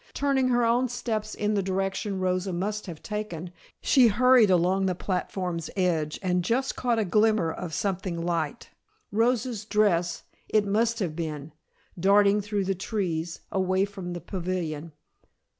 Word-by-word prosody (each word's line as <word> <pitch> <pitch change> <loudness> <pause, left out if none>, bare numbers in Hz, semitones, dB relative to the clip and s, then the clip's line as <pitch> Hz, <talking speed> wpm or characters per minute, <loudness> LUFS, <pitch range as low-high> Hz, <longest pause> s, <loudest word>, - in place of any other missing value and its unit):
Turning 275 -2 +2
her 240 -1 +3
own 245 +2 +2
steps 220 -3 -3
in 210 0 0
the 200 - +1
direction 195 +1 -2
Rosa 185 +1 0
must 205 +4 -3
have 165 -4 -8
taken, 195 -6 -5 0.3
she 260 -4 +6
hurried 245 0 +5
along 185 +2 +3
the 185 - 0
platform's 180 -3 -3
edge 165 -5 0
and 180 -1 +1
just 255 +8 0
caught 240 -2 0
a 220 - +1
glimmer 210 -3 +3
of 175 0 -6
something 185 -1 -2
light 170 +5 -2 0.4
Rosa's 230 0 +1
dress 195 -6 +1 0.3
it 215 -1 +3
must 225 +3 +1
have 180 -8 -2
been 155 -2 -5 0.5
darting 200 +2 +4
through 205 0 -1
the 195 - +1
trees, 175 -4 -3
away 190 0 +1
from 190 -3 -7
the 175 - -6
pavilion. 170 -3 -4
195 Hz, 150 wpm, -27 LUFS, 175-215 Hz, 0.5 s, she